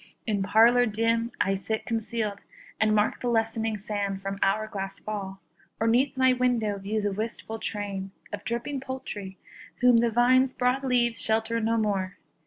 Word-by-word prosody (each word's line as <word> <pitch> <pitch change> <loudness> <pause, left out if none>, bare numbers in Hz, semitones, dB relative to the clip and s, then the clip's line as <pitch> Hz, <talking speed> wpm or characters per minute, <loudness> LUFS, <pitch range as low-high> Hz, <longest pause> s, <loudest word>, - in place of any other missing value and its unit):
In 210 -4 0
parlour 235 +5 +5
dim 230 +2 0
I 195 - +2
sit 215 +3 -3
concealed, 225 -3 -2 0.4
And 215 -1 +3
mark 210 0 +1
the 245 - -2
lessening 225 -1 0
sand 200 -2 -3
from 195 0 -4
hour 215 +3 +2
glass 195 -2 -5
fall; 195 -2 -6 0.4
Or 225 - +1
'neath 260 +4 +2
my 260 0 +5
window 240 -5 +1
view 210 +2 -2
the 205 - +1
wistful 220 +2 -5
train 200 -3 -4 0.2
Of 205 0 -5
dripping 240 +5 -3
poultry, 255 -8 -6 0.4
whom 250 -1 +6
the 235 0 +3
vine's 255 +3 +4
broad 250 +2 +1
leaves 240 -3 +1
Shelter 220 +1 0
no 230 +1 +1
more. 195 -4 -1
220 Hz, 165 wpm, -27 LUFS, 205-240 Hz, 0.4 s, whom